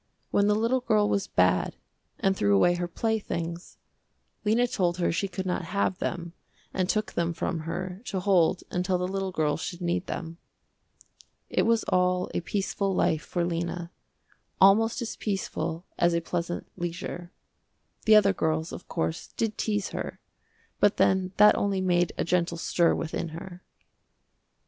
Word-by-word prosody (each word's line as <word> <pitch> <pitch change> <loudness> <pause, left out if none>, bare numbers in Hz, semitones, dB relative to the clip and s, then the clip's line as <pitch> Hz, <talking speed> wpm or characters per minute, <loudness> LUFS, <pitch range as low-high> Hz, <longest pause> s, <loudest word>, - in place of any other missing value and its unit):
When 200 0 +3
the 210 - +4
little 230 +4 +2
girl 215 -4 +2
was 200 -1 0
bad - - +2 0.4
and 195 -2 +2
threw 100 - +3
away 175 - +5
her 175 0 -2
playthings, 175 -4 -3 0.7
Lena 225 +3 +3
told 180 -7 0
her 175 - +1
she 195 +4 -1
could 190 0 -5
not 180 -1 -1
have 190 -2 +1
them 170 -1 -3 0.4
and 185 -1 0
took 215 0 0
them 170 0 0
from 165 +1 -2
her 185 +2 -4
to 190 - -2
hold 185 -2 +3
until 180 +1 0
the 180 0 -1
little 195 0 -2
girl 150 -4 0
should 175 +2 -5
need 175 +1 -1
them. 165 0 -5 1.1
It - - +2
was 230 -1 +3
all 180 0 +1
a - - -1
peaceful 195 +1 -1
life 160 -3 +2
for 175 0 -2
Lena, 170 0 -3 0.7
almost 225 +5 +5
as 225 - -5
peaceful 170 -4 -3
as 175 0 +3
a - - +3
pleasant 175 +1 -3
leisure. 175 0 -5 0.7
The 220 -1 +7
other 200 -2 +6
girls, 160 -1 -1
of - - -9
course, 165 -1 -2
did 225 -1 -2
tease 205 -2 -1
her, - - -5 0.6
but 205 - +4
then 190 -1 +2
that 210 +1 +7
only 200 -1 0
made 175 -2 +2
a - - +1
gentle 170 0 0
stir 170 0 +2
within 165 +1 -3
her. 180 0 -9
180 Hz, 160 wpm, -27 LUFS, 170-200 Hz, 1.1 s, The